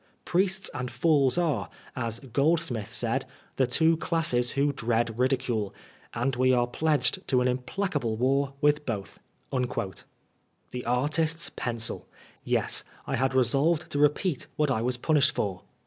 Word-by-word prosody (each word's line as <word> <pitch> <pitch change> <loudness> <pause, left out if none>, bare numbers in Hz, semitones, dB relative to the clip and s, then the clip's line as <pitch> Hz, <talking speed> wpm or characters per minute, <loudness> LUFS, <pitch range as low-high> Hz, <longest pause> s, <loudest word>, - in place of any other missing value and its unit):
Priests 190 +2 +1
and 125 0 -4
fools 145 -3 +2
are, 140 - 0 0.3
as 115 -2 -3
Groldsmith 140 -4 0
said, 120 +3 +1 0.3
the 130 - +3
two 160 +6 +3
classes 155 -8 +1
who 140 +1 +2
dread 115 -2 -1
ridicule, 125 -5 0 0.4
and 125 +3 0
we 130 +1 +3
are 120 -1 +3
pledged 155 +7 +1
to 130 - +3
an 125 - +2
implacable 125 - -2
war 135 +3 +1
with 150 0 +3
both." 105 -5 -4 0.3
The 125 0 -6
artist's 155 +6 0
pencil! 115 -2 -1 0.4
Yes, - - 0 0.2
I - - -1
liad 130 +1 0
resolved 140 +6 +2
to 145 - -1
repeat 150 +1 +1
what 150 -2 +1
I 110 - 0
was 125 +1 0
punished 150 +2 +3
for. 100 -3 -2
130 Hz, 140 wpm, -27 LUFS, 120-150 Hz, 0.4 s, the